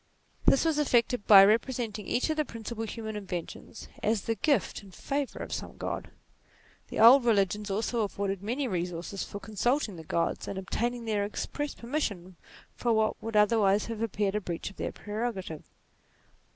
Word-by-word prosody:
This 275 Hz, -, +5 dB
was 315 Hz, -2 st, +2 dB
effected 245 Hz, -5 st, +2 dB
by 195 Hz, -2 st, +10 dB
repre 230 Hz, +5 st, +2 dB
senting 215 Hz, -4 st, -4 dB
each 255 Hz, -, +1 dB
of 310 Hz, -, -2 dB
the 305 Hz, -, +2 dB
principal 230 Hz, -3 st, -6 dB
human 220 Hz, -1 st, -5 dB
inventions 185 Hz, -5 st, -6 dB
as 215 Hz, -1 st, +1 dB
the 225 Hz, -, 0 dB
gift 285 Hz, +4 st, 0 dB
and 200 Hz, -2 st, -14 dB
favour 275 Hz, +8 st, -3 dB
of -, -, -6 dB
some -, -, -6 dB
God. -, -, -4 dB, 0.8 s
The -, -, -5 dB
old 240 Hz, +4 st, +9 dB
religions 210 Hz, -2 st, +1 dB
also 225 Hz, +4 st, 0 dB
afforded 195 Hz, -2 st, -2 dB
many 250 Hz, +7 st, -2 dB
resources 180 Hz, 0 st, -3 dB
for 200 Hz, -, -7 dB
consulting 220 Hz, -, -1 dB
the 160 Hz, -, -8 dB
Gods, 165 Hz, +1 st, -1 dB
and 195 Hz, -, -4 dB
obtaining 235 Hz, +5 st, -2 dB
their 210 Hz, -2 st, 0 dB
express 290 Hz, +7 st, -4 dB
permission 205 Hz, -, -3 dB, 0.4 s
for 240 Hz, -, 0 dB
what 220 Hz, -1 st, +1 dB
would 225 Hz, -1 st, -5 dB
otherwise 210 Hz, -1 st, +4 dB
have 225 Hz, -1 st, -5 dB
appeared 205 Hz, -3 st, 0 dB
a 210 Hz, -, -1 dB
breach 175 Hz, +1 st, -4 dB
of -, -, -20 dB
their -, -, -3 dB
prerogative. 210 Hz, -7 st, -4 dB
215 Hz, 170 wpm, -29 LUFS, 195-240 Hz, 0.8 s, by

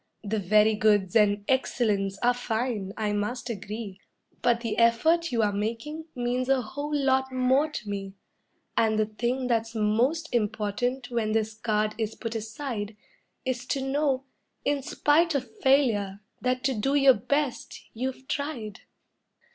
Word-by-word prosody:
The 215 Hz, +1 st, -1 dB
'very 210 Hz, +3 st, +4 dB
goods' 210 Hz, -3 st, +2 dB
and 205 Hz, -2 st, +4 dB
'excellents' 210 Hz, -7 st, +1 dB
are 245 Hz, +1 st, +5 dB
fine, 230 Hz, -4 st, -2 dB
I 210 Hz, -1 st, 0 dB
must 240 Hz, +4 st, -2 dB
agree, 210 Hz, -1 st, -6 dB, 0.4 s
But 235 Hz, -1 st, +2 dB
the 230 Hz, -1 st, -2 dB
effort 315 Hz, +9 st, +3 dB
you 230 Hz, -2 st, +2 dB
are 205 Hz, -1 st, +1 dB
making 230 Hz, +10 st, -3 dB
means 250 Hz, +1 st, -1 dB
a 270 Hz, -1 st, +4 dB
whole 285 Hz, +7 st, -5 dB
lot 265 Hz, -2 st, +2 dB
more 260 Hz, +4 st, +2 dB
to 255 Hz, -8 st, -6 dB
me; 195 Hz, -1 st, -5 dB, 0.6 s
And 220 Hz, -1 st, +3 dB
the 215 Hz, -, +3 dB
thing 240 Hz, +4 st, -2 dB
that's 230 Hz, -2 st, 0 dB
most 240 Hz, +10 st, +1 dB
important 240 Hz, +3 st, -1 dB
when 220 Hz, -3 st, 0 dB
this 220 Hz, 0 st, 0 dB
card 215 Hz, -1 st, 0 dB
is 220 Hz, -1 st, -2 dB
put 230 Hz, -1 st, -5 dB
aside 220 Hz, -1 st, -4 dB, 0.5 s
Is 255 Hz, -1 st, -1 dB
to 270 Hz, +1 st, -1 dB
know, 270 Hz, -1 st, +1 dB, 0.4 s
in 285 Hz, -1 st, +1 dB
spite 310 Hz, +4 st, +2 dB
of 280 Hz, -, -3 dB
failure, 225 Hz, -, +2 dB, 0.2 s
that 255 Hz, 0 st, 0 dB
to 270 Hz, -1 st, +2 dB
do 265 Hz, +5 st, 0 dB
your 275 Hz, -2 st, +7 dB
best 280 Hz, +5 st, -2 dB
you've 260 Hz, +2 st, -4 dB
tried. 250 Hz, -9 st, -4 dB
235 Hz, 150 wpm, -27 LUFS, 215-265 Hz, 0.6 s, your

